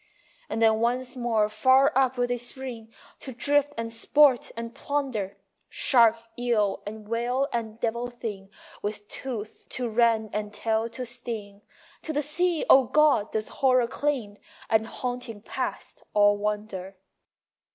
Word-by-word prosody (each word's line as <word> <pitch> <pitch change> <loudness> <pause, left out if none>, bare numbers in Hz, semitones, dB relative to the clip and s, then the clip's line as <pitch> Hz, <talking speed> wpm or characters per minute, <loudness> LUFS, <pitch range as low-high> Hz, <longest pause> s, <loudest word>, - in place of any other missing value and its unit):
And 225 - 0
then 220 -1 +4
once 250 +3 -1
more 230 -4 +1
far 260 +6 +4
up 260 -1 +2
will 245 - +2
they 245 0 -1
spring, 245 -2 -6 0.3
To 265 - -7
drift 290 +3 +2
and 230 0 -3
sport 270 +2 +4
and 230 0 -5
plunder, 255 -10 -3 0.3
Shark, 230 -3 +4 0.2
eel 225 -5 +1
and 215 0 -8
whale 245 +4 0
and 225 -1 -3
devil 235 +2 -1
thing, 220 -5 -7 0.3
With 205 0 -4
tooth 225 -5 -6
to 250 -2 -3
rend 225 -1 +2
and 210 0 -3
tail 225 +1 0
to 250 +2 -6
sting. 225 -4 -5 0.4
To 315 - -4
the 295 +1 0
sea, 340 +3 +1
O 265 -1 +7
God, 275 -4 +3
does 215 -1 -2
horror 255 -2 +4
cling 235 -6 -2 0.3
And 220 0 +3
haunting 245 -3 -5
past - - -5
all 205 0 +5
wonder. 205 -2 -4
235 Hz, 145 wpm, -26 LUFS, 215-255 Hz, 0.4 s, O